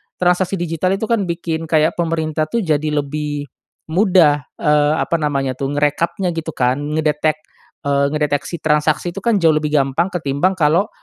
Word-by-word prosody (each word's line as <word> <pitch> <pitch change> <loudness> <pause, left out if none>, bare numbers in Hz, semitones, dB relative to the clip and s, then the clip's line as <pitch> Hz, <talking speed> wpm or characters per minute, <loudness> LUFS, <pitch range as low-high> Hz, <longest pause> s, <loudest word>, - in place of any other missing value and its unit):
transaksi 180 +1 +1
digital 175 +1 -1
itu 205 - -6
kan 210 -5 +1
bikin 165 -1 -3
kayak 155 0 +3
pemerintah 160 -2 -1
tuh 230 +7 -1
jadi 155 -2 0 0.2
lebih 145 -1 -4 0.4
mudah, 165 -5 +3 0.2
eee, 150 -1 +3
apa 170 - 0
namanya 140 -4 -1
tuh 135 +2 -3
ngerekapnya 165 +5 0
gitu 160 0 -4
kan 125 -3 +1
ngedetek 150 +1 0 0.5
eee, 140 0 +2
ngedeteksi 150 +2 -1
transaksi 155 +3 0
itu 195 - -6
kan 230 -4 +2
jauh 165 -3 +4
lebih 150 0 0
gampang 135 +7 0
ketimbang 175 +3 0
kalau, 165 +7 +3
155 Hz, 160 wpm, -18 LUFS, 145-175 Hz, 0.5 s, jauh